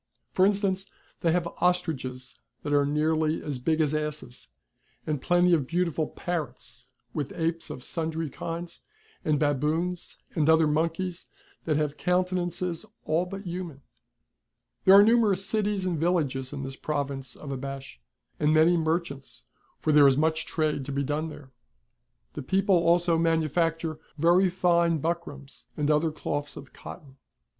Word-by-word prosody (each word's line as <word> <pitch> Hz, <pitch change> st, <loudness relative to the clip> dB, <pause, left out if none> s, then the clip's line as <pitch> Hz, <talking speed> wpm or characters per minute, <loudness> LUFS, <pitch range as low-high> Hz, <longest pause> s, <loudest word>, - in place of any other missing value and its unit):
For 190 Hz, +1 st, +4 dB
instance 195 Hz, -1 st, 0 dB, 0.3 s
they 165 Hz, -, +2 dB
have 175 Hz, 0 st, +1 dB, 0.2 s
ostriches 130 Hz, -9 st, -1 dB, 0.2 s
that 145 Hz, -, -2 dB
are 145 Hz, -1 st, +3 dB
nearly 155 Hz, +1 st, +1 dB
as 145 Hz, -4 st, -3 dB
big 160 Hz, +5 st, 0 dB
as 155 Hz, -2 st, +2 dB
asses; 150 Hz, -5 st, -4 dB, 0.6 s
and 150 Hz, -3 st, -2 dB
plenty 175 Hz, +2 st, +3 dB
of 145 Hz, -6 st, +2 dB
beautiful 170 Hz, -2 st, 0 dB
parrots, 175 Hz, -3 st, -5 dB, 0.3 s
with 145 Hz, -2 st, -3 dB
apes 165 Hz, 0 st, -2 dB
of 125 Hz, -, -7 dB
sundry 160 Hz, -1 st, -2 dB
kinds, 170 Hz, +4 st, -6 dB, 0.4 s
and 150 Hz, -2 st, +1 dB
baboons 155 Hz, +5 st, -1 dB, 0.2 s
and 155 Hz, -1 st, +2 dB
other 160 Hz, 0 st, +6 dB
monkeys 165 Hz, +4 st, -1 dB, 0.4 s
that 155 Hz, -2 st, +1 dB
have 150 Hz, -1 st, -1 dB
counte 180 Hz, +2 st, +1 dB
nances 175 Hz, -1 st, -2 dB, 0.2 s
all 165 Hz, +4 st, +1 dB
but 195 Hz, +2 st, -7 dB
human/' 175 Hz, -6 st, -6 dB, 1.0 s
There 190 Hz, -, +9 dB
arc 200 Hz, +1 st, +9 dB
numerous 215 Hz, -4 st, +3 dB
cities 205 Hz, -2 st, 0 dB
and 175 Hz, -4 st, -1 dB
villages 145 Hz, -6 st, 0 dB
in 140 Hz, -2 st, -5 dB
this 135 Hz, 0 st, -6 dB
province 140 Hz, -3 st, -3 dB
of 145 Hz, -, -8 dB
Abash, 135 Hz, -, -6 dB, 0.4 s
and 150 Hz, 0 st, +3 dB
many 160 Hz, +3 st, +5 dB
merchants; 160 Hz, -4 st, -2 dB, 0.3 s
for 155 Hz, -, 0 dB
there 145 Hz, -1 st, +7 dB
is 135 Hz, -1 st, +4 dB
much 160 Hz, +1 st, +1 dB
trade 155 Hz, -3 st, -1 dB
to 140 Hz, -, -5 dB
be 140 Hz, +1 st, -1 dB
done 150 Hz, +3 st, -2 dB
there. 145 Hz, -3 st, -12 dB, 0.8 s
The 150 Hz, -, -5 dB
peo|)le 190 Hz, +9 st, 0 dB
also 170 Hz, -1 st, +3 dB
manufacture 165 Hz, 0 st, 0 dB, 0.2 s
very 175 Hz, +4 st, +4 dB
fine 170 Hz, -2 st, +2 dB
buckrams 150 Hz, -3 st, -5 dB
and 150 Hz, 0 st, +1 dB
other 150 Hz, +2 st, +3 dB
cloths 145 Hz, -1 st, -4 dB
of 140 Hz, -, -11 dB
cotton. 135 Hz, -3 st, -11 dB
160 Hz, 150 wpm, -27 LUFS, 145-175 Hz, 1.0 s, There